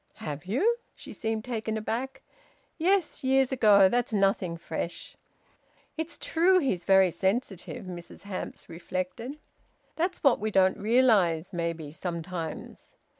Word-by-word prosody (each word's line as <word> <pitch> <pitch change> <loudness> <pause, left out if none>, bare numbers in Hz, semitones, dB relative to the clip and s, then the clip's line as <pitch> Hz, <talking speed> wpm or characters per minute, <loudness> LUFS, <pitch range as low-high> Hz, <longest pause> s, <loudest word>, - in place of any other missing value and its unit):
"Have 150 +2 -6
you?" 395 - +2 0.2
She - - -10
seemed 220 -1 -3
taken 220 -3 -3
aback. 240 +5 -4 0.6
"Yes. 365 -1 +1
Years 265 0 +3
ago. 210 -6 +6
That's 240 +4 0
nothing 195 -4 +1
fresh." 170 +1 -6 0.8
"It's 320 +1 -4
true 360 +3 +3
he's 195 - 0
very 190 -2 +5
sensitive," 190 0 -2
Mrs 175 -1 -9
Hamps 200 -2 -6
reflected. 185 - -5 0.6
"That's 350 +3 -1
what 275 -4 +5
we 215 - -1
don't 190 -2 +3
realise, 205 -7 +3
maybe, 165 -3 -3
sometimes. 170 0 -6
205 Hz, 125 wpm, -28 LUFS, 180-260 Hz, 0.8 s, ago